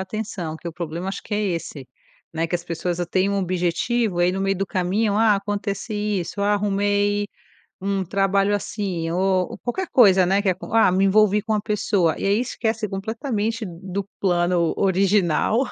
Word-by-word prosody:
atenção. 195 -5 -5
Que 170 - -7
o - - -7
problema 170 +2 -5
acho 195 - -5
que - - -10
é 210 - +1
esse, 165 -8 -4 0.4
né, 165 +1 -1
que 170 - -4
as 175 - -1
pessoas 170 +1 -3
têm 190 +1 +2
um 200 - 0
objetivo, 185 +3 0
aí 175 +1 +3
no 190 - -3
meio 195 0 +1
do 195 - -1
caminho, 200 +3 0
ah, 220 -1 +4
acontece 205 +2 -3
isso, 205 -2 -2
ah, 205 +1 +2
arrumei 205 0 +1 0.5
um 195 0 -1
trabalho 195 +2 +1
assim 190 -5 -3
ou 185 +1 0
qualquer 355 +10 -3
coisa, 195 -7 +6
né, 195 +3 +2
que 205 - -1
acon 185 0 -3
ah, 225 -5 +5
me 190 +2 +2
envolvi 210 +1 +4
com 220 +1 -2
uma 210 - +1
pessoa 205 -6 0
e - - -4
aí 200 +3 +2
esquece 225 -3 -2
completamente 220 +2 -3
do 185 +2 -5 0.2
plano 175 -2 +1
original. 195 +1 +2
195 Hz, 180 wpm, -22 LUFS, 180-210 Hz, 0.5 s, coisa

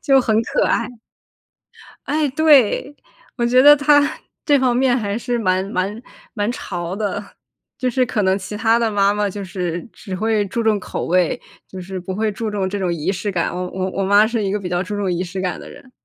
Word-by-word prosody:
就 270 -2 +4
很 225 -4 +1
可 - - 0
爱， 230 - 0 1.2
哎， 300 0 0
对， 285 -2 +3 0.4
我 235 - +1
觉 250 +2 +5
得 290 +1 +9
她， 290 0 +4 0.4
这 285 -3 +4
方 250 -2 +2
面 255 0 +3
还 205 -2 -2
是 240 0 -2
蛮 185 -3 +1
蛮 200 +4 -2 0.3
蛮 210 0 -1
潮 175 -7 -5
的。 205 -1 -3 0.5
就 255 - 0
是 255 +1 +1
可 215 - -1
能 190 +1 +2
其 200 +2 -7
他 225 +1 +3
的 230 -2 0
妈 200 -1 +3
妈 210 0 0
就 200 +1 -6
是 180 -2 -3
只 195 - -9
会 215 +1 0
注 230 +5 -2
重 220 -2 +2
口 - - -5
味， 180 +6 +1 0.3
就 190 - -8
是 185 +1 -6
不 185 +1 -6
会 215 +3 0
注 215 +1 -4
重 195 -2 -1
这 205 - -3
种 185 -3 -1
仪 170 +3 -1
式 205 +2 -3
感， 175 -2 -1
我 180 0 -3
我 185 0 -2
我 195 - -2
妈 205 +2 +5
是 230 -2 -1
一 195 - -1
个 210 - -1
比 185 - -5
较 175 +1 0
注 205 +3 -5
重 195 -3 -1
仪 175 +1 -1
式 185 +2 -6
感 180 -3 -2
的 - - -10
人。 260 - -15
205 Hz, 240 characters per minute, -20 LUFS, 185-235 Hz, 1.2 s, 得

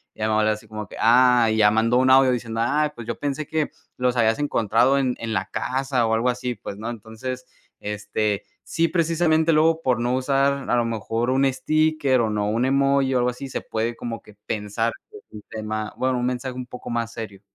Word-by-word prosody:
Y - - -24
ya 110 - 0
mi 110 - 0
abuela 110 0 +3
así 110 +1 -10
como 105 -2 -7
que - - -12
ah, 120 0 +5
y 110 - 0
ya 105 -1 +6
mandó 115 +3 +2
un 130 +1 +3
audio 130 0 +6
diciendo: 115 -2 -2
"Ay, 150 +5 +1
pues 120 - -8
yo 115 - -4
pensé 145 +1 -2
que 155 -2 -1 0.3
los 125 -1 +1
habías 115 +1 +2
encontrado 125 -1 +2
en 130 -2 0
en 115 -1 -4
la 95 -2 -2
casa 130 -2 0
o 110 - +1
algo 115 +3 +2
así, 125 0 -2
pues", 100 0 -8
¿no? 110 +3 -5
Entonces, 120 +3 -6 0.3
este, 105 0 -2 0.2
sí 165 0 0
precisamente 165 -1 +2
luego 160 +1 +3
por 125 -5 +1
no 120 +1 0
usar 135 +1 +1
a - - +3
lo 120 - +2
mejor 115 +2 -2
un 135 +1 +3
sticker 155 -1 +1
o 110 - 0
no, 105 0 -1
un 115 +3 0
emoji 135 0 +2
o - - +4
algo 125 0 +2
así, 135 +2 -8
se - - -3
puede 115 +1 -3
como 115 -2 -5
que 105 - -17
pensar 110 +2 -2 0.2
que 425 - -11
es - - -15
un 105 - -9
tema, 110 -1 -4
bueno, 130 -1 0
un 120 - -1
mensaje 125 0 -3
un 125 - -5
poco 125 - -9
más 115 -1 -2
serio. 105 -4 -7
120 Hz, 230 wpm, -23 LUFS, 110-135 Hz, 0.3 s, ya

